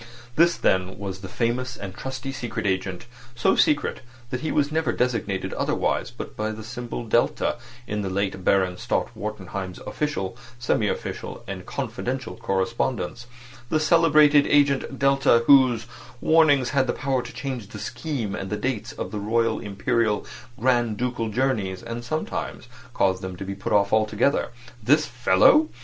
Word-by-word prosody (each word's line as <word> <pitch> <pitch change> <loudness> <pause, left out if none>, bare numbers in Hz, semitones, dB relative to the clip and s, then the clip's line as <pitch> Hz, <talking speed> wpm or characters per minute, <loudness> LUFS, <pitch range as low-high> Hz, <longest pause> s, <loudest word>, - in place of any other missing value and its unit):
This 170 +2 +5
was - - -12
then 95 0 +1 0.2
the 95 - -7
famous 125 +2 -1
and 95 -2 -6
trusty 130 +3 -5
secret 125 -6 -4
agent, 95 +1 -1 0.3
so 115 - +3
secret 150 -3 +2 0.3
that 125 - -2
he 155 - -2
was 145 0 +1
never 160 +1 +1
designated 115 -6 -1
otherwise - - 0
but - - -8
by 110 0 -2
the 110 0 -6
symbol 120 +1 -5
[delta] 115 +2 +1 0.3
in 105 -2 -2
the 95 - -2
late 95 0 -2
Baron 95 -1 +2
Stott - - -2
Wartenheim's 95 -3 -5
official, 145 -10 -2 0.2
semi 115 -3 +1
official, - - -4
and 95 -2 -7
confidential 130 0 -4
correspondence; 115 +2 -2 0.4
the 155 - +2
celebrated 155 -2 +5
agent 140 -2 +2
[delta], 135 -3 +4
whose 130 -5 +5 0.3
warnings 145 -5 +4
had 135 -2 +2
the - - +1
power 135 -3 0
to - - -9
change 130 -7 -5
the - - -9
schemes 130 -11 -4
and 95 - -5
the 105 - -2
dates 115 0 -3
of - - -6
royal, 110 +2 +1
imperial, 105 +1 0 0.3
grand 120 -3 +2
ducal 120 -2 -2
journeys, 105 -6 -1
and 115 +1 -5
sometimes 155 +6 -4 0.3
caused 95 -1 +2
them 95 -1 -5
to 95 +2 -7
be 100 - -4
put 100 - -5
off 100 0 +3
altogether! 110 +5 +2 0.3
This 150 +7 +4
fellow! 125 - +4
115 Hz, 155 wpm, -24 LUFS, 100-135 Hz, 0.4 s, This